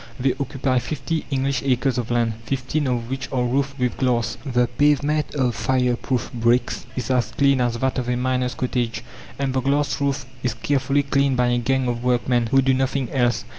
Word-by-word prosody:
They 130 +1 +2
occupy 135 -1 0
fifty 155 +4 -3
English 135 -1 0
acres 130 -1 +1
of 120 - -4
land, 120 -2 +1
fifteen 135 +3 -1
of 120 -2 -1
which 135 +1 -4
are 130 -2 +1
roofed 140 +3 0
with 125 -2 -1
glass. 125 -3 +1
The 125 -4 +2
pavement 145 +5 +1
of 130 -4 +1
fire 125 -1 +1
proof 125 0 -2
bricks 120 +1 +1
is 125 0 -2
as 125 -2 +1
clean 140 -2 +2
as 120 -1 0
that 130 +2 0
of 125 -1 -3
a 125 - +1
miner's 125 0 0
cottage, 125 -3 -2 0.3
and 135 -2 -1
the 130 - +1
glass 140 +2 0
roof 140 -1 0 0.2
is 125 -3 -1
carefully 135 +3 +1
cleaned 140 -1 +1
by 125 0 +3
a 120 0 +2
gang 130 +2 0
of 120 0 -2
workmen 125 -1 +1
who 135 +3 +3
do 135 0 +3
nothing 130 -1 -1
else. 120 -3 +1
130 Hz, 200 wpm, -22 LUFS, 125-135 Hz, 0.3 s, by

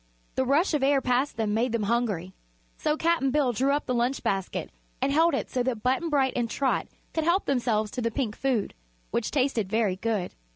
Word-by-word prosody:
The 260 - 0
rush 300 +8 +2
of 300 - +1
air 275 +1 +4
past 255 0 0
them 215 -2 0
made 235 +2 +1
them 230 -2 0
hungry, 205 -5 -1 0.4
so 300 0 0
Cap'n 330 -4 +2
Bill 275 -2 +2
drew 265 +5 +1
up 290 +1 0
the 255 - -1
lunch 245 +3 0
basket 195 -1 -2 0.3
and 270 +2 +1
held 325 0 +4
it - - -2
so 255 - -1
that 245 -4 -2
Button 265 +7 +1
Bright 270 -4 +2
and 240 -2 0
Trot 270 +2 0 0.3
could 320 - 0
help 345 +4 +2
themselves 225 -5 0
to 250 - -4
the 230 - +1
pink 225 -2 -2
food, 255 -6 0 0.4
which 235 - -1
tasted 255 -8 0
very 210 -3 +1
good. 210 -3 -2
250 Hz, 210 wpm, -27 LUFS, 225-280 Hz, 0.4 s, air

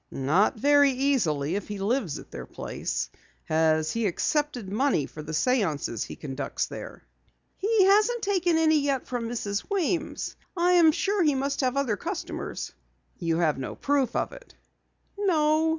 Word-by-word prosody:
"Not 160 +12 +2
very 285 +2 +5
easily 235 - +1
if 205 - -3
he 210 - -5
lives 200 - -1
at - - -12
their - - -7
place. - - -4 0.3
Has 155 0 +2
he 230 -2 0
accepted 270 - -1
money 215 - +1
for 155 - -9
the 150 - -7
séances 160 - 0
he - - -8
conducts 135 -2 -3
there?" - - -9 0.5
"He 420 0 +3
hasn't 425 +5 +4
taken 360 -4 +2
any 315 -1 +4
yet 280 -2 0
from 240 -2 -3
Mrs. 205 -4 -3
Weems. 365 -4 -1 0.2
I 350 +1 +3
am 340 -3 +6
sure 400 +5 0
he 300 -4 +3
must 275 +2 -1
have 260 0 0
other 250 -7 +1
customers." - - -5 0.5
"You 165 -1 0
have 155 -5 +1
no 130 - -5
proof 275 -4 0
of - - 0
it?" - - -14 0.6
"No." 315 -5 +3
265 Hz, 160 wpm, -27 LUFS, -, 0.6 s, am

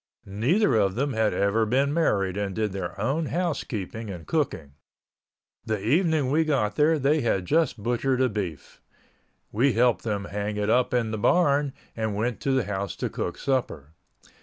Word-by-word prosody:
Neither 125 - +1
of 95 -3 +2
them 135 +3 -1
had 110 -1 +1
ever 100 +3 +1
been 135 +6 +1
married 100 - +1
and 100 -2 -3
did 110 -2 -1
their 95 -1 -5
own 140 +9 0
housekeeping 115 - -3
and 90 -4 -7
cooking. 110 - -2 0.9
The 110 -2 -2
evening 150 - +1
we 160 +3 +3
got 130 -10 0
there 155 +4 +3
they 145 +2 +2
had 95 -6 0
just 155 - +1
butchered 125 +2 0
a 130 - +4
beef. 100 - -6 0.7
We 125 +5 +2
helped 120 0 +2
them 105 -3 -2
hang 105 +1 -4
it 105 +1 0
up 125 +1 +2
in 120 -3 0
the 110 - -3
barn 145 - +2 0.2
and 110 -2 -2
went 115 +2 -1
to 135 - -1
the 130 -2 +2
house 100 0 -3
to - - -3
cook - - -4
supper. 85 - -2
115 Hz, 175 wpm, -26 LUFS, 100-140 Hz, 0.9 s, a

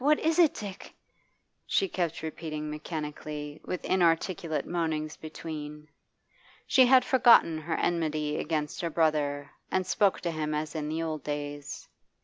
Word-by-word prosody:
what 295 +3 +4
is 320 +2 +1
it, 330 -4 +7
Dick?' 200 -3 -8 0.7
she 390 - +1
kept 170 - -2
repeating 155 -1 -5
mechanically, 150 -1 -5
with 180 - -4
inarticulate 165 -2 +1
moanings 160 -3 -2
between. 150 -1 -7 0.8
She 260 -3 +5
had 255 0 +6
forgotten 235 -11 +5
her 160 +1 -3
enmity 155 -3 0
against 150 -2 -2
her 170 - -1
brother 150 -3 0 0.2
and 185 0 0
spoke 195 +2 +2
to 170 - -1
him 155 -1 -2
as 150 0 -3
in 155 -2 -3
the 160 +1 -2
old 155 -2 -3
days. 145 0 -5
160 Hz, 140 wpm, -29 LUFS, 150-175 Hz, 0.8 s, it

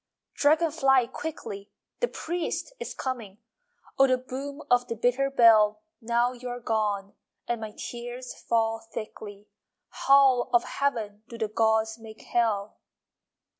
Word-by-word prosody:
Dragon 310 +2 +3
fly, 270 -5 +4
quickly, 230 -7 -7 0.3
The 485 - +2
priest 350 +5 -4
is 480 - -6
coming! 230 -7 -5 0.6
Oh, 270 - +7
the 255 -1 +3
boom 275 +3 -7
Of 245 0 +4
the 230 - -3
bitter 245 +4 +1
bell! 215 -4 +5 0.2
Now 235 +2 +1
you 250 0 -7
are 245 0 -5
gone 210 -4 -1 0.3
And 240 -1 -2
my 215 -1 -6
tears 245 +1 -6
fall 225 -1 0
thickly. 215 -2 -9 0.4
How 270 -3 +4
of 240 - +5
Heaven 220 -7 -2
Do 235 - -8
the 220 -1 -1
gods 220 +1 +1
make 220 -1 -12
Hell! 215 -4 0
235 Hz, 135 wpm, -27 LUFS, 220-260 Hz, 0.6 s, Oh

